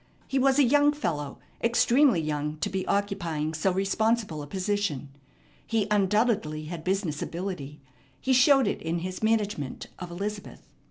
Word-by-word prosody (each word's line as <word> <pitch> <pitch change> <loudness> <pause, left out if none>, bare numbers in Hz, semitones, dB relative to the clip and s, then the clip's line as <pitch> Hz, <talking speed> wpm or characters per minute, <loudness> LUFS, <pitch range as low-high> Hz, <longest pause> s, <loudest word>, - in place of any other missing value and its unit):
He 270 - 0
was 270 +1 +3
a 290 - +6
young 290 +3 +4
fellow, 150 - -3 0.3
extremely 235 - +4
young 150 -1 -2
to 205 - -1
be 190 -1 -2
occupying 170 -7 -1
so 160 +5 +1
responsible 195 -2 0
a 145 - -8
position. 190 -6 -2 0.6
He 225 -3 +1
undoubtedly 200 -6 +1
had 165 0 -6
business 185 -5 -1
ability. 165 -6 -5 0.4
He 265 - +1
showed 270 +1 +6
it 200 - -2
in 165 +1 -2
his 185 0 -5
management 210 - -1
of 180 - -6
Elizabeth. 200 +4 -6
195 Hz, 150 wpm, -27 LUFS, 155-225 Hz, 0.6 s, a